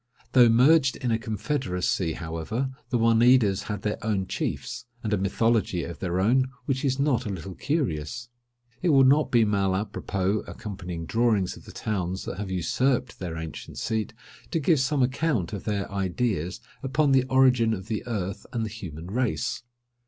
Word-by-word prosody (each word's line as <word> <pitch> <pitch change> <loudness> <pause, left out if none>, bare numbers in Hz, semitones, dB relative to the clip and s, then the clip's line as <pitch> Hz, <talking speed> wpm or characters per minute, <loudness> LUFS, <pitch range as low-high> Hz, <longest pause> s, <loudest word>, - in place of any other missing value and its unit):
Though 125 -2 +7
merged 130 +4 +5
in 125 -3 -2
a 110 - +1
confederacy, 105 - -1
however, 85 +12 -3 0.2
the 125 - +1
Oneidas 115 -3 +4
had 105 - -3
their 105 0 -2
own 105 -3 0
chiefs; - - -4 0.2
and 110 -2 -1
a - - +3
mythology 100 -2 +1
of 85 -4 -7
their 90 -1 -1
own, 125 +7 +3 0.2
which 135 -1 -1
is 130 -2 +1
not 135 -5 +1
a - - -2
little 95 -1 -5
curious. 125 - -2 0.5
It 180 - +2
will 135 -3 +6
not 145 +4 +4
be 115 -2 +4
mal 100 -2 +1
apropos, 100 0 -1
accompanying 90 -5 -6
drawings 110 -2 +1
of - - -14
the - - -10
towns 95 -3 -3
that 90 - -5
have 105 -2 -4
usurped 125 +7 0
their 85 -3 -4
ancient 80 -1 -7
seat, 110 0 -2 0.3
to 165 - 0
give 155 0 +3
some 135 0 +2
account 130 - 0
of 100 - -5
their 100 -2 -1
ideas 95 -2 -1 0.2
upon 140 +1 +1
the 130 -1 +4
origin 130 -3 +4
of 95 -2 -8
the 110 -2 -2
earth 100 -4 -3
and 115 -3 -1
the - - -4
human 85 -7 -8
race. 120 +4 -1
110 Hz, 175 wpm, -26 LUFS, 95-130 Hz, 0.5 s, Though